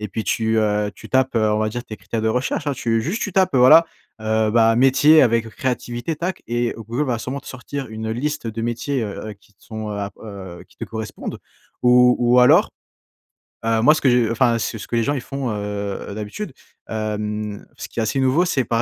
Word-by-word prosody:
et 105 - -4
puis 110 +2 -4
tu, 110 +3 +1
heu, 105 -1 +1
tu - - -12
tapes, 130 -2 +1
heu, 110 -1 +2
on 105 - +1
va 110 0 0
dire, 120 +3 -5
tes 110 - -8
critères 115 0 -4
de 110 - +1
recherche, 125 +5 -1
hein, 145 - +1
tu 115 -2 0
juste 185 - -2
tu 205 - -3
tapes, 185 -3 +2
heu, - - +4
voilà, 155 +7 +8 0.3
heu, 110 0 +1
ben: 115 0 +4
«métier 135 +5 +6
avec 115 -2 +2
créativité», 120 +4 -3
tac, 180 +3 -4
et 120 0 -1
Google 115 +6 -3
va 120 -3 -1
sûrement 130 +5 -5
te - - -22
sortir 135 +1 -6
une 110 0 -5
liste 145 +2 -2
de 115 +1 -4
métiers, 120 +3 -2
heu 105 +1 -6
heu, - - -5
qui 100 +1 -28
te - - -32
sont, 110 -1 -6
heu 105 - -4
ah 100 -1 -3
heu, 95 -4 -9
qui - - -25
te - - -5
correspondent. 110 -1 -6 0.4
Ou 125 0 +6
ou 120 +1 +4
alors, 125 - +5 1.0
heu, 115 -1 +2
moi 150 +6 +6
ce 155 - -2
que 135 - +4
je 120 -2 +3
enfin, 115 0 +2
ce 115 - -3
ce 105 - -9
que - - -3
les 115 - +2
gens 145 - 0
ils 135 - -3
font, 135 -1 -4
heu - - -2 0.6
heu, - - -7
d'habitude, 110 - -6 0.4
hem, 105 -1 -3
ce - - -6
qui - - -6
est - - +2
assez 110 +5 -1
nouveau, 130 +6 +3
c'est 135 -8 0
par 115 -1 0
115 Hz, 240 wpm, -21 LUFS, 110-130 Hz, 1.0 s, voilà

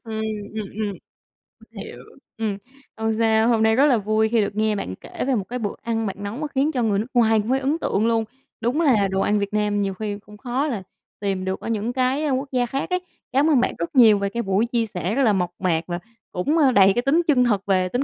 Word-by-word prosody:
Ừm, 220 -1 -4 0.3
ừm, 215 -2 -3
ừm. 210 -2 -2 0.7
Mình - - -11
hiểu, - - -10 0.4
ừm. 215 -3 -2 0.4
Hông 220 0 0
sao, 220 0 +3
hôm 225 -2 +3
nay 220 0 +4
rất 275 +4 +5
là 260 -5 +4
vui 215 +1 +1
khi 230 -2 +2
được 200 0 -2
nghe 215 0 +1
bạn 95 - -4
kể - - -6
về 265 - +2
một 200 - -1
cái 250 0 -3
bữa 205 -3 -3
ăn 225 -1 -2
bạn 195 - -3
nấu 205 +3 -4
mà 300 0 -3
khiến 285 +2 0
cho 250 -5 -1
người 205 -2 +1
nước 225 - -3
ngoài 225 -3 +4
cũng 215 +3 -3
phải 265 +1 +2
ấn 280 +4 0
tượng 215 +3 0
luôn. 225 -1 +2 0.4
Đúng 250 +8 0
là 220 -10 +3
đồ 190 0 -1
ăn 210 0 +2
Việt 200 +1 -3
Nam 210 -1 +1
nhiều 195 -1 -1
khi 205 +1 -4
cũng 210 0 -14
khó 260 +5 -2
là 215 -9 -3 0.4
tìm 195 -2 -2
được 190 0 -2
ở - - -8
những 225 +2 -1
cái, 260 +3 +1
a, 295 - 0
quốc 270 +2 -1
gia 250 -2 +1
khác 270 +3 -3
ấy. 365 0 +1 0.3
Cảm 285 +4 +3
ơn 280 -5 +4
bạn - - +1
rất 170 +9 -4
nhiều 220 -5 +7
về 200 0 -1
cái 235 +3 -3
buổi 195 +4 +1
chia 235 -1 0
sẻ 185 +1 -3
rất 275 - +2
là 215 -4 +4
mộc 180 -2 0
mạc 170 -4 +1
và 175 0 -3 0.3
cũng, 290 - 0
ơ, 275 -5 +5
đầy 195 -3 +6
cái 240 - +2
tính 280 +7 +3
chân 255 -5 +4
thật 205 -5 +1
về 185 -2 +1
tính 245 +7 -1
220 Hz, 270 wpm, -23 LUFS, 200-255 Hz, 0.7 s, nhiều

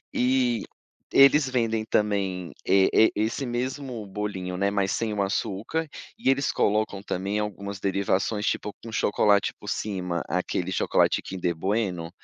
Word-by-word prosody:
E 125 -2 +2 0.5
eles 140 +1 +6
vendem 115 -3 0
também, 100 -5 0
eh 95 -1 +5
eh, 110 - +6
esse 110 +6 -1
mesmo 125 -2 -4
bolinho, 95 -2 -4
né, 100 +1 +1
mas 100 -1 0
sem 110 -2 -1
o 100 - 0
açúcar, 100 +10 -2 0.3
e 130 - +2
eles 135 +1 +1
colocam 105 -1 0
também 100 +1 -2
algumas 100 -1 -4
derivações, 100 +2 0
tipo, 105 - -1
com 115 - -8
chocolate 105 -1 +2
por 105 - -10
cima, 90 -6 -2
aquele 90 +2 -2
chocolate - - +2
Kinder 90 -2 -3
Bueno? 90 -2 -1
105 Hz, 140 wpm, -26 LUFS, 95-115 Hz, 0.5 s, eles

